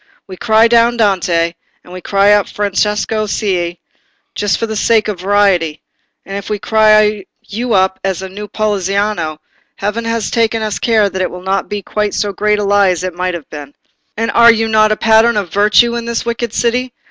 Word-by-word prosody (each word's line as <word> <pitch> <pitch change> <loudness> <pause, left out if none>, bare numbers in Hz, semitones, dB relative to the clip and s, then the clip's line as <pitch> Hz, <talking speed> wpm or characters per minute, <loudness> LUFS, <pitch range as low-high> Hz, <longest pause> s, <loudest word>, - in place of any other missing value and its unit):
We 190 - -10
cry 220 +3 +3
down 235 0 +3
Dante, 175 -6 +1 0.3
and 180 - -14
we 185 - -8
cry 200 +2 +2
up 205 -1 +2
Francesco 210 +1 -1
Cei, 180 -5 -2 0.5
just 205 -1 -1
for - - -2
the 220 -1 -5
sake 220 0 +2
of 205 -4 -4
variety; 185 -5 +1 0.4
and 195 - -7
if 200 -1 -6
we 210 - -1
cry 215 -1 +2 0.2
you 230 +3 -4
up 190 0 +1
as 190 -1 -2
a - - -5
new 205 +2 -8
Poliziano, 200 -5 -2 0.4
heaven 210 +3 -3
has 230 -1 -2
taken 225 -2 0
care 220 -3 +2
that 190 -1 -4
it 185 - -1
shall 180 - -9
not 190 +1 -2
be 205 -1 -4
quite 210 +1 -2
so 200 +1 -2
great 210 +2 0
a 210 - -2
lie 200 -1 +3
as 180 -1 -2
it 185 -1 -3
might 180 +1 -3
have 165 -4 -9
been. 145 -2 -9 0.4
And 230 +1 -1
are 235 0 +6
you 225 0 0
not 215 -1 +3
a 215 - 0
pattern 225 +1 +3
of 190 -5 -3
virtue 210 +4 +3
in 235 -1 -4
this 235 0 -3
wicked 235 -1 -3
city? 245 +2 -1
205 Hz, 200 wpm, -14 LUFS, 190-220 Hz, 0.5 s, are